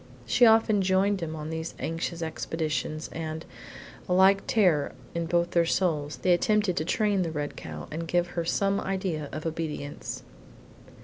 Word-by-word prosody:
She 245 Hz, -, +5 dB
often 220 Hz, -2 st, +5 dB
joined 190 Hz, +1 st, +2 dB
him 160 Hz, -1 st, -3 dB
on 155 Hz, 0 st, -5 dB
these 160 Hz, 0 st, -4 dB
anxious 165 Hz, +1 st, -3 dB
expeditions, 160 Hz, -1 st, -3 dB
and, 160 Hz, 0 st, -5 dB, 0.6 s
a -, -, +3 dB
like 190 Hz, +2 st, +5 dB
terror 180 Hz, -10 st, +3 dB, 0.2 s
in 170 Hz, -1 st, -2 dB
both 175 Hz, +1 st, +1 dB
their 170 Hz, -1 st, +3 dB
souls, 155 Hz, -5 st, 0 dB
they 180 Hz, -, +5 dB
attempted 205 Hz, +1 st, +2 dB
to 155 Hz, -, 0 dB
train 205 Hz, +1 st, +1 dB
the 170 Hz, -, -1 dB
red 145 Hz, -2 st, -3 dB
cow -, -, -7 dB
and 165 Hz, +2 st, -4 dB
give 175 Hz, +1 st, +1 dB
her 170 Hz, -1 st, -2 dB
some 195 Hz, +4 st, +1 dB
idea 185 Hz, -6 st, -2 dB
of 155 Hz, +3 st, -6 dB
obedience. 155 Hz, -3 st, -4 dB
170 Hz, 165 wpm, -27 LUFS, 160-190 Hz, 0.6 s, She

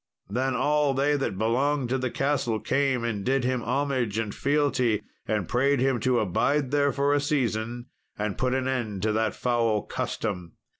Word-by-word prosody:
Then 130 Hz, +3 st, 0 dB
all 145 Hz, +1 st, +2 dB
they 145 Hz, +2 st, +2 dB
that 120 Hz, -8 st, -2 dB
belonged 125 Hz, +5 st, +1 dB
to 130 Hz, +1 st, 0 dB
the 130 Hz, 0 st, -1 dB
castle 135 Hz, -5 st, 0 dB
came 135 Hz, -2 st, 0 dB
and 110 Hz, -4 st, -2 dB
did 135 Hz, +2 st, +1 dB
him 125 Hz, 0 st, 0 dB
homage 125 Hz, -3 st, -1 dB
and 110 Hz, -2 st, -2 dB
fealty, 135 Hz, -6 st, +1 dB, 0.2 s
and 105 Hz, -5 st, -1 dB
prayed 135 Hz, +2 st, +2 dB
him 130 Hz, -1 st, +2 dB
to 125 Hz, +2 st, +2 dB
abide 135 Hz, +8 st, +1 dB
there 140 Hz, -1 st, +3 dB
for 140 Hz, +1 st, +1 dB
a 145 Hz, -, +3 dB
season 120 Hz, -4 st, -1 dB, 0.3 s
and 105 Hz, -1 st, -2 dB
put 130 Hz, 0 st, 0 dB
an 130 Hz, -1 st, -1 dB
end 110 Hz, -7 st, -2 dB
to 110 Hz, -, +2 dB
that 110 Hz, +1 st, 0 dB
foul 115 Hz, -4 st, +1 dB
custom. 90 Hz, -6 st, -4 dB
125 Hz, 180 wpm, -26 LUFS, 110-140 Hz, 0.3 s, there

